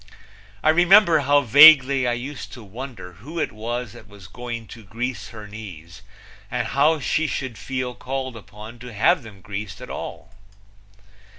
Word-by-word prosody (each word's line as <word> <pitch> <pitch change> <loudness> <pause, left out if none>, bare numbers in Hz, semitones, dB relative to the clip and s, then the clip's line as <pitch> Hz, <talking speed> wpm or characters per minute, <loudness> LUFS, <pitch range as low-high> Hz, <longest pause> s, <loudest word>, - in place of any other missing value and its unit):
I - - +4
remember 175 +1 +6
how 145 0 +3
vaguely 140 0 +7
I 120 - +1
used 130 +3 -7
to 120 - -10
wonder 110 -3 -9
who 135 - -11
it 160 - -1
was 115 +1 -5
that - - -14
was 100 -2 -15
going 115 +3 -7
to 115 - -11
grease 115 0 -5
her 105 -1 -10
knees 90 -7 -11 0.5
and - - -2
why 150 +4 +3
she 155 +3 0
should 130 -5 -4
feel 130 +1 -4
called 130 0 -5
upon 110 +2 -12
to 125 0 -10
have 145 - +3
them 105 -5 -14
greased 100 0 -7
at - - -9
all. - - -8
120 Hz, 165 wpm, -22 LUFS, 105-140 Hz, 0.5 s, vaguely